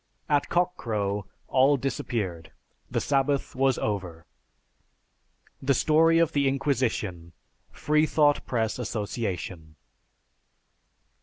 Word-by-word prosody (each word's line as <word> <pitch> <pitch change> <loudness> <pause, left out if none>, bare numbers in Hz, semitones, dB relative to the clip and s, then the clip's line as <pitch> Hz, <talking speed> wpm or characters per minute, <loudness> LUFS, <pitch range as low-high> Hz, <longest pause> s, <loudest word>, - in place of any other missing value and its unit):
At 145 -1 +1
cock 180 0 +1
crow, 100 -3 -2 0.2
all 135 +2 +4
disappeared; 110 - -3 0.4
the - - 0
sabbath 140 0 0
was 135 0 +2
over." 90 -6 -3 1.4
(_"The 135 0 +2
Story 165 +4 +4
of 165 -1 +3
the 140 -2 +1
Inquisition" 120 - -1 0.4
Freethought 150 -1 +2
Press 115 -1 -1
Association. 100 -8 -4
130 Hz, 90 wpm, -26 LUFS, 100-145 Hz, 1.4 s, all